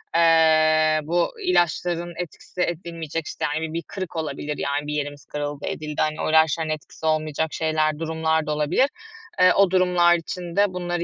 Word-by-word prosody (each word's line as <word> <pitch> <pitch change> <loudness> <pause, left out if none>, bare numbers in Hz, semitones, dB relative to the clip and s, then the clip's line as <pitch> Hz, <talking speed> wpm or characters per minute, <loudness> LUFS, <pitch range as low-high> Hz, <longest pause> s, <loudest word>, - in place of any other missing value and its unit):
eee, 155 -1 +4
bu 170 +3 0
ilaçların 175 - +1
etkisi 180 +1 -6
edilmeyecek, 165 -2 -3
işte, - - -3
hani, 150 +2 -2
bir - - -9
bir 170 0 -3
kırık 185 -3 -6
olabilir, 150 -1 -4
yani, 145 +1 -2
bir 150 - -3
yerimiz 145 -1 -4
kırıldı, 145 -1 -5
edildi, 150 -1 -3
hani, 155 0 -1
o - - -1
ilaçların 160 0 +3
etkisi 155 +1 -6
olmayacak 155 0 0
şeyler, 155 -1 0
durumlar 160 -1 0
da 150 - 0
olabilir. 150 - +2 0.5
Eee, 185 0 +6
o 195 -2 +4
durumlar 180 -2 +4
için 170 +1 -6
de 200 -2 +3
bunları 175 -1 -2
160 Hz, 170 wpm, -23 LUFS, 155-175 Hz, 0.5 s, Eee